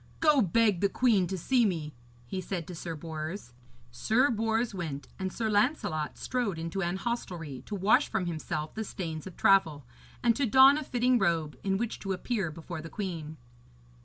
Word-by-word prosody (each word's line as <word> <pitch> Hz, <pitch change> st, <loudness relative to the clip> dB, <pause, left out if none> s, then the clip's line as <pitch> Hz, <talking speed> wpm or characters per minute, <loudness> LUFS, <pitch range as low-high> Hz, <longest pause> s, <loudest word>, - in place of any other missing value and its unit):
'Go 300 Hz, -4 st, +5 dB
beg 210 Hz, -1 st, +2 dB
the 200 Hz, -, +3 dB
queen 210 Hz, -6 st, +3 dB
to 190 Hz, -, -3 dB
see 245 Hz, +7 st, +2 dB
me,' 160 Hz, -8 st, -1 dB, 0.3 s
he 185 Hz, +10 st, -4 dB
said 180 Hz, -3 st, -4 dB
to 180 Hz, -, -8 dB
Sir 165 Hz, 0 st, -5 dB
Bors. 155 Hz, -2 st, -6 dB, 0.4 s
Sir 225 Hz, -, +2 dB
Bors 225 Hz, +1 st, 0 dB
went, 155 Hz, -7 st, -5 dB
and 190 Hz, -1 st, -2 dB
Sir 225 Hz, +3 st, -2 dB
Lancelot 205 Hz, -, 0 dB
strode 240 Hz, -9 st, -2 dB
unto 165 Hz, +4 st, -3 dB
an 175 Hz, 0 st, -1 dB
hostelry 175 Hz, -, -4 dB
to 210 Hz, -, -4 dB
wash 200 Hz, +2 st, +3 dB
from 220 Hz, -5 st, -1 dB
himself 155 Hz, -2 st, -4 dB
the 220 Hz, -, -3 dB
stains 165 Hz, -5 st, -5 dB
of 185 Hz, -, -11 dB
travel, 190 Hz, -9 st, +3 dB, 0.4 s
and 230 Hz, -1 st, +4 dB
to 280 Hz, -2 st, +1 dB
don 265 Hz, +5 st, +7 dB
a -, -, -5 dB
fitting 250 Hz, -1 st, +2 dB
robe 165 Hz, -6 st, 0 dB
in 195 Hz, -1 st, +1 dB
which 230 Hz, +1 st, -3 dB
to 195 Hz, -1 st, -2 dB
appear 195 Hz, -2 st, -2 dB
before 165 Hz, +1 st, -7 dB
the 165 Hz, -, -8 dB
queen. 165 Hz, -6 st, -5 dB
190 Hz, 185 wpm, -29 LUFS, 160-225 Hz, 0.4 s, don